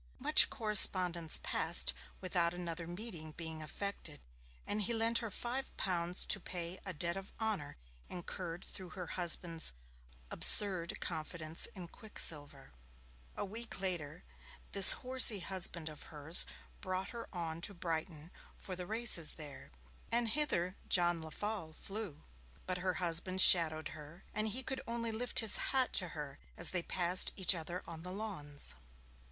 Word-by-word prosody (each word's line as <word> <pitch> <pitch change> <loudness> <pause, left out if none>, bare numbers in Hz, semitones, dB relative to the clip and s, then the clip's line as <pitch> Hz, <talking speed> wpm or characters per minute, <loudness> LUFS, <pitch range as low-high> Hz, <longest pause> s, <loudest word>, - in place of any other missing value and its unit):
Much - - +5
correspondence 180 -6 +4
passed - - 0 0.3
without 175 -2 -3
another 170 -1 -9
meeting 175 -4 -11
being 160 -1 -9
effected, 155 -1 -7 0.5
and 210 +1 -4
he 230 +3 -3
lent 230 +1 0
her 230 - -7
five 245 +6 -7
pounds 175 -1 -2
to 200 - -2
pay 175 0 -6
a - - -5
debt 170 +1 -5
of 195 0 -11
honour 215 -10 -6 0.3
incurred 175 0 -10
through 185 -2 -11
her 180 -2 -10
husband's 170 - -1 0.6
'absurd 185 -5 +7
confidence 155 0 -5
in 180 -3 -11
Quicksilver'. 145 -8 -3 0.7
A - - -5
week 225 +3 -11
later 175 -4 -5 0.5
this 195 -1 +13
horsey 255 -4 +4
husband 175 -3 -1
of 155 -1 -11
hers 155 +2 +5 0.3
brought 185 0 -6
her 235 -1 -11
on 165 -3 -8
to 200 - -4
Brighton 165 -2 -8 0.2
for 185 - -8
the 180 0 -10
races 215 -8 0
there, 145 -4 -13 0.4
and 235 0 0
hither 205 - -1
John 175 -2 -1
Lefolle 165 +1 -8
flew. 195 -4 -9 0.4
But 185 -1 -5
her 185 0 -5
husband 175 +2 -4
shadowed 160 -4 +4
her, 155 +4 -15
and 215 +1 -3
he 245 +5 -4
could 265 +1 -6
only 230 0 -5
lift 240 +3 -1
his 220 -2 +4
hat 260 -1 -2
to 180 - +1
her 145 -2 -10 0.2
as - - -1
they 180 - -1
passed 180 +1 +3
each 190 0 +2
other 175 +1 -8
on 165 -1 -11
the 180 +2 -10
Lawns. 180 -9 -6
180 Hz, 145 wpm, -31 LUFS, 165-205 Hz, 0.7 s, this